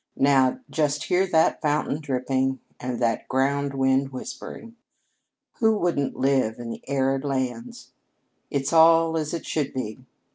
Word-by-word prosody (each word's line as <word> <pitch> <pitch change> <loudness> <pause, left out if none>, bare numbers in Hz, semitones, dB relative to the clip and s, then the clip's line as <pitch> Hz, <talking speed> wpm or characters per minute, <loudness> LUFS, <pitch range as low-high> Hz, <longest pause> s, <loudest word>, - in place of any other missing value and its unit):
Now, 135 - +3
just 150 -2 0
hear 185 +2 +1
that 160 -3 +2
fountain 150 0 0
dripping 130 -1 -1 0.2
and 125 -1 -4
that 115 -2 0
ground 140 +1 0
wind 135 0 +2
whispering! 225 - -8 0.8
Who 220 -1 +3
wouldn't 170 -7 -1
live 130 -4 +1
in 120 -1 -6
the - - -7
arid 135 0 0
lands? 145 - -4 0.6
It's 140 +1 -2
all 165 0 +6
as 155 -1 -2
it 170 - -4
should 145 -4 -2
be. 110 -4 -4
140 Hz, 140 wpm, -24 LUFS, 130-160 Hz, 0.8 s, all